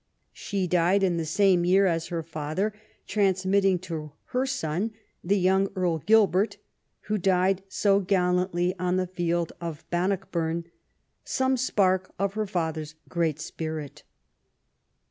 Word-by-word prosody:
She 195 -2 -2
died 180 +3 +2
in 180 -3 +2
the 165 - -1
same 185 +1 +3
year 190 +3 +4
as 165 -3 0
her 170 -2 -3
father, 160 +6 -2 0.3
transmitting 195 -1 +2
to 160 -5 -6 0.2
her 255 +2 0
son, 215 - -2 0.3
the 200 +4 +2
young 190 +1 +3
Earl 175 -3 0
Gilbert, 210 +1 +3 0.4
who 215 0 -2
died 190 +1 +2
so 200 +1 +2
gallantly 180 -2 +1
on 180 0 0
the 185 0 +1
field 175 -2 -1
of 165 -3 -6
Ban 175 +2 +1
nockburn, 170 -4 -2 0.6
some 260 0 +1
spark 190 -7 +1
of 195 0 -1
her 215 0 -2
father's 160 -4 -3
great 165 -3 0
spirit. 155 -3 -5
185 Hz, 135 wpm, -26 LUFS, 170-195 Hz, 0.6 s, year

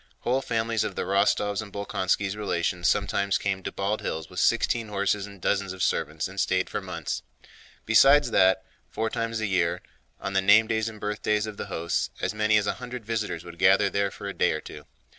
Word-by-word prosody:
Whole 130 +2 +1
families 115 -2 0
of 95 - -4
the - - -2
Rostóvs' 100 +2 +1
and 105 -2 -9
Bolkónskis' 100 0 -1
relations 85 -4 -1
sometimes 100 0 +1
came 100 -1 -2
to - - -5
Bald 100 +2 -2
Hills 80 -2 -4
with - - -4
sixteen 115 -2 +2
horses 100 0 -1
and 100 -1 -13
dozens 100 0 0
of 95 - -3
servants 80 +2 -1
and 95 +1 -8
stayed 95 0 +1
for - - -2
months. - - -4 0.6
Besides 135 +4 +6
that, 95 -1 +4 0.2
four 110 0 -2
times 115 -1 -2
a - - 0
year, 90 -4 0 0.4
on 95 - -4
the 95 - +3
name 105 +3 +6
days 110 0 -1
and 110 -1 -11
birthdays 105 0 -1
of 110 -2 -7
the - - -5
hosts, 85 +1 -1
as - - -1
many 105 0 +3
as 105 - +1
a - - 0
hundred 125 -2 -7
visitors 110 -6 -3
would 85 -1 -11
gather 95 +1 +4
there 100 0 +1
for 100 - -8
a 100 - -4
day - - +2
or 80 - -3
two. - - -11
100 Hz, 210 wpm, -26 LUFS, 95-110 Hz, 0.6 s, Besides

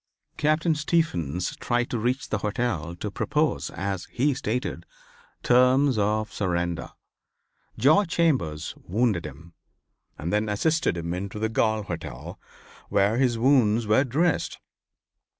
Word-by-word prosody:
Captain 155 +2 +2
Stephens 90 - -1
tried 120 0 0
to 120 - -1
reach 125 +4 -1
the 110 - -1
hotel 100 -6 -2
to 105 +4 -5
propose, 150 +5 0
as 95 -2 -4
he 140 +4 0
stated, 125 -1 -3 0.6
terms 125 +2 +4
of 105 0 0
surrender. 85 -3 -2 0.9
George 155 +9 +4
Chambers 130 - 0
wounded 100 -4 0
him, 80 +4 -13 0.6
and 85 +5 -4
then 105 +1 +1
assisted 155 - +1
him 85 0 -3
into 95 +3 -5
the 110 +1 -1
Galt 110 -1 +1
hotel, 85 -3 -7 0.5
where 100 +3 +2
his 125 -3 +2
wounds 115 -3 +3
were 110 +5 +4
dressed. 150 +6 0
110 Hz, 125 wpm, -25 LUFS, 95-135 Hz, 0.9 s, terms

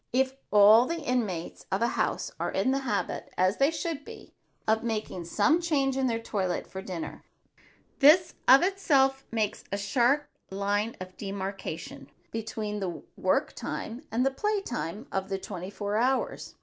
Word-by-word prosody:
If 265 +1 +1
all 210 +4 +7
the 335 0 -2
inmates 215 - -2
of 195 +4 +1
a 235 - +3
house - - -1
are - - -1
in 260 - +1
the 270 - +1
habit, 235 -7 -2
as 185 +3 +2
they 275 +1 +4
should 325 -2 -3
be, 450 -2 -12 0.3
of 220 +1 +3
making 215 -6 -3
some 310 - +3
change 280 -6 +1
in 265 -1 +1
their 230 -2 0
toilet 195 -5 -2
for 190 - -7
dinner, 180 -4 -6 0.8
this 330 +5 +6
of 265 +4 +8
itself 275 -9 +2
makes 220 -3 -1
a 200 - 0
sharp 245 +8 +2 0.2
line 205 +3 -1
of 185 0 -9
demarcation 195 -7 -5 0.2
between 215 -2 -4
the 180 -4 -4
work - - +1
time 235 +4 -5
and 240 +4 +1
the 270 - +3
play 420 +9 0
time 220 - -4
of 190 0 -2
the 195 - -1
twenty 185 -1 -6
four 205 +1 -2
hours. 260 +3 0
225 Hz, 165 wpm, -28 LUFS, 200-270 Hz, 0.8 s, of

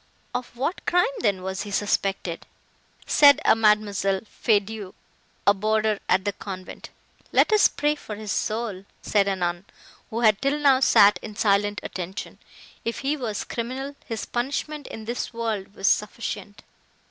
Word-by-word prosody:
"Of 250 -1 -5
what 285 +8 -2
crime, 355 0 +4
then, 200 -5 0
was 190 0 -3
he 210 - -6
suspected?" 195 -3 -1 0.6
said 285 -1 +6
a - - +6
Mademoiselle 210 -3 +2
Feydeau, 210 -2 -1 0.5
a 200 - +6
boarder 215 +1 +1
at 190 +1 +3
the 205 - 0
convent. 185 -1 -8 0.4
"Let - - +4
us 425 - +7
pray 295 0 0
for 225 -8 -8
his 210 -1 -6
soul!" 215 -3 -2 0.2
said 200 -2 +2
a 195 - +1
nun, 175 -1 -2 0.5
who 230 +2 -3
had 215 -2 +4
till 275 +2 +1
now 280 -3 +4
sat 205 -5 +6
in 215 - -8
silent 205 -1 +1
attention. 185 +2 -6 0.4
"If 230 - -3
he 280 +2 0
was 235 -7 -3
criminal, 260 +4 -5
his 225 -2 -5
punishment 285 +4 -3
in 220 - -8
this 240 +1 -4
world 220 -4 -3
was 195 - -5
sufficient." 210 -1 -1
215 Hz, 155 wpm, -25 LUFS, 200-240 Hz, 0.6 s, us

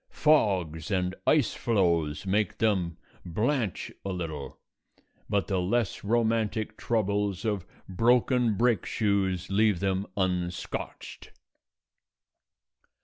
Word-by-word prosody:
Fogs 95 - +2
and 90 -2 0
ice 150 -6 +3
floes 85 -8 +1
make 100 0 0
them 95 -7 +1 0.3
blench 110 - -1
a 100 - -4
little; 80 -6 -5 0.7
but 100 -1 +1
the 95 -3 0
less 105 +4 -1
romantic 110 -1 0
troubles 105 -3 -1
of 100 -4 -1 0.2
broken 120 +3 +3
brake 115 -4 +2
shoes 100 -4 0
leave 105 -2 +3
them 95 +1 -1
unscotched. 90 -2 -3
100 Hz, 95 wpm, -28 LUFS, 90-110 Hz, 0.7 s, ice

